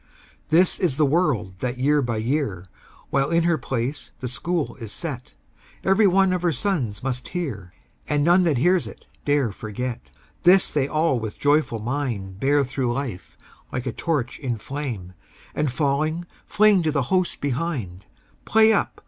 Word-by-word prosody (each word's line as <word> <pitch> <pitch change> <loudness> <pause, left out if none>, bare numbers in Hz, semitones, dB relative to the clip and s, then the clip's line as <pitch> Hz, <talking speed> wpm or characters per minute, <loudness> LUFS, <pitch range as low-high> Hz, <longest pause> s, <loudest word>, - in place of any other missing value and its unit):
This 175 +3 +3
is 170 -8 0
the 155 - +4
word 135 - 0
that 125 +2 -2
year 145 +3 +3
by 120 -4 -2
year, 110 - -1 0.5
While 140 +1 +2
in 170 0 +3
her 170 -2 +2
place 130 +3 -3
the 130 - -4
School 165 +6 -2
is 115 -5 -7
set, 135 -8 -6 0.5
Every 195 +2 +4
one 190 0 +4
of 180 - -1
her 175 -1 +2
sons 145 - -2
must 125 -2 -3
hear, 115 - -5 0.3
And 145 -1 +2
none 175 +4 +5
that 155 -6 +2
hears 175 +6 +3
it - - -12 0.2
dare 145 -6 +2
forget. 115 +4 -5 0.3
This 185 +1 +5
they 140 -3 +1
all 155 -4 +1
with 110 -2 -5
a - - -27
joyful 145 -4 +2
mind 110 -6 -3
Bear 140 +3 +3
through 130 -2 -1
life 120 -7 -5 0.3
like 125 - -3
a 130 - -1
torch 145 -8 -2
in 125 -5 -2
flame, 115 -8 -5 0.4
And 150 -3 0
falling 155 +5 0 0.2
fling 210 -3 +4
to 160 -2 +1
the 140 -3 +1
host 185 -1 +1
behind 130 - -3 0.4
"Play 220 0 +5
up! 200 - -1
140 Hz, 170 wpm, -23 LUFS, 120-170 Hz, 0.5 s, none